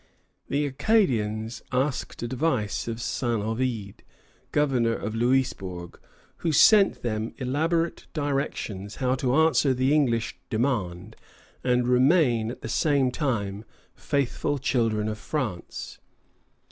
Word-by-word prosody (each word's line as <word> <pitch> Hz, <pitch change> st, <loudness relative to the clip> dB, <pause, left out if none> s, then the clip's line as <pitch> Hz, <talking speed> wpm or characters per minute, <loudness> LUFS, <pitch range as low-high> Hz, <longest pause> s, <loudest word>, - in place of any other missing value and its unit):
The 145 Hz, +1 st, +1 dB
Acadians 120 Hz, -, +1 dB
asked 130 Hz, -1 st, -1 dB
advice 120 Hz, -4 st, -1 dB
of 115 Hz, -1 st, -3 dB
Saint 120 Hz, -2 st, -1 dB
Ovide, 110 Hz, -3 st, -3 dB, 0.5 s
governor 125 Hz, -6 st, +2 dB
at 110 Hz, -, -4 dB
Louisbourg, 115 Hz, -8 st, -1 dB, 0.4 s
who 165 Hz, -, -1 dB
sent 200 Hz, +7 st, +5 dB
them 110 Hz, -2 st, -2 dB
elaborate 160 Hz, +6 st, -1 dB
directions 135 Hz, -, -3 dB
how 130 Hz, -1 st, 0 dB
to 130 Hz, -1 st, 0 dB
answer 155 Hz, -4 st, +4 dB
the 130 Hz, +3 st, +2 dB
English 120 Hz, -7 st, +1 dB
demand 110 Hz, -8 st, -1 dB, 0.5 s
and 125 Hz, -1 st, +2 dB
remain 125 Hz, -3 st, +3 dB
at 120 Hz, -, -8 dB
the -, -, -5 dB
same 140 Hz, -4 st, +2 dB
time 105 Hz, -8 st, -2 dB, 0.3 s
faithful 140 Hz, +1 st, -1 dB
children 115 Hz, -5 st, 0 dB
of 110 Hz, 0 st, -4 dB
France. 115 Hz, -, -4 dB
125 Hz, 110 wpm, -26 LUFS, 110-140 Hz, 0.5 s, sent